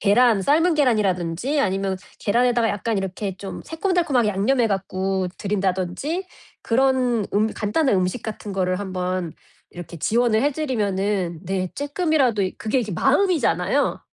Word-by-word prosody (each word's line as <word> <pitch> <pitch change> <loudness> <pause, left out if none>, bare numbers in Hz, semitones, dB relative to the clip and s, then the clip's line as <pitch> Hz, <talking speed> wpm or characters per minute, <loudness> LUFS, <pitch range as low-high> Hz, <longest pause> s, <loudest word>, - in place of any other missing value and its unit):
계란, 215 0 +4
삶은 325 - +3
계란이라든지 215 - +1
아니면 195 -2 0 0.2
계란에다가 235 +1 +2
약간 210 +2 -2
이렇게 195 0 -4
좀 195 +1 -7
새콤달콤하게 325 - +1
양념해 230 +5 +2
갖고 190 -1 -1
드린다든지 195 - -2 0.4
그런 250 -3 +2
음 215 +2 +3
간단한 225 +4 +1
음식 185 +6 -1
같은 215 -2 -6
거를 185 -1 0
한번 185 -3 -3 0.4
이렇게 175 -1 -9
지원을 230 - +2
해 290 - +3
드리면은 200 - -1
네 185 0 -2
조금이라도 285 - +1
그게 220 +4 0
이렇게 215 -5 -2
마음이잖아요. 315 - +1
210 Hz, 350 characters per minute, -22 LUFS, 190-260 Hz, 0.4 s, 계란